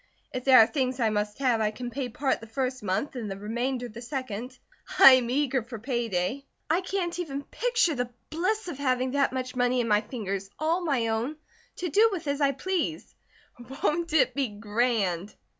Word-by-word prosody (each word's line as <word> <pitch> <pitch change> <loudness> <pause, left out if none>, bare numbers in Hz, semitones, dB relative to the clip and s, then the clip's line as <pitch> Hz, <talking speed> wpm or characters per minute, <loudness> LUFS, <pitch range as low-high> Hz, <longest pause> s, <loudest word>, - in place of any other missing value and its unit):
If 255 -1 -4
there 265 -1 +8
are 225 - +9
things 260 0 -1
I 225 -2 +2
must 210 0 -2
have, 250 -5 +2
I 215 - +2
can 245 +3 -6
pay 255 0 -3
part 265 +3 0
the 225 - -10
first 255 +2 -2
month 205 +9 -2
and 230 -4 -4
the 195 - -5
remainder 240 +5 -2
the 235 +1 -10
second. 255 -1 -5 0.4
I 270 - +11
am 255 -2 +4
eager 265 0 +1
for 235 +1 -8
pay 235 0 -2
day. 195 +10 -2 0.2
I 340 +3 +3
can't 365 -2 -2
even 285 -5 -4
picture 480 -6 +1
the 245 -3 -2 0.2
bliss 380 +7 -1
of 285 -6 -6
having 255 -2 +1
that 280 0 +2
much 255 -1 -4
money 250 0 +2
in 235 - 0
my 210 -1 +3
fingers, 200 -5 -5
all 330 +4 0
my 265 -8 +1
own, 230 +7 -1 0.4
to 355 - -3
do 435 +8 +5
with 340 -6 -4
as 285 +1 -1
I 280 -1 +4
please. 325 +3 -3 0.7
Won't 335 +2 +1
it 280 -5 +4
be 275 -2 0
grand?" 210 -3 -1
255 Hz, 200 wpm, -27 LUFS, 225-285 Hz, 0.7 s, I